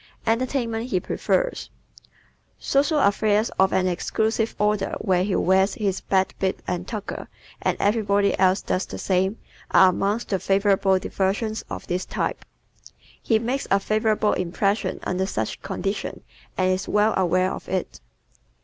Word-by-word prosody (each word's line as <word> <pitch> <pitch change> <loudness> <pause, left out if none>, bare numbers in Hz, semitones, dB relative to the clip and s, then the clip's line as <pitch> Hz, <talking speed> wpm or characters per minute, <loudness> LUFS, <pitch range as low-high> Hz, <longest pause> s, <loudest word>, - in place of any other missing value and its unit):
Entertainment 235 0 -1
He 185 - +1
Prefers - - -1 0.3
¶ - - -30 0.5
Social 290 +3 +1
affairs 210 +1 +2
of 190 0 +4
an 185 - +2
exclusive 220 +5 0
order 210 -1 0
where 185 -3 +1
he 195 0 0
wears 190 +2 +3
his 195 -3 -1
"best 190 -1 +1
bib 190 -1 0
and 180 0 -3
tucker" 215 -3 -5 0.3
and - - 0
everybody 205 -1 +2
else 190 +1 +3
does 185 - -1
the - - -7
same, 190 +3 0 0.3
are 190 - +6
amongst 200 +5 -1
the 195 - 0
favorite 195 +1 +2 0.2
diversions 205 +4 -1
of - - -6
this 180 +1 -2
type. - - -3 0.8
He 225 - +2
makes 245 +5 -2
a 195 - +4
favorable 215 +1 +1
impression 195 +4 -1
under 185 +1 -1
such 110 - -3
conditions 195 +1 -4 0.3
and 185 0 +2
is 185 +1 -2
well 210 +1 +3
aware 185 0 +2
of - - -7
it. 185 - -3
200 Hz, 150 wpm, -24 LUFS, 190-220 Hz, 0.8 s, are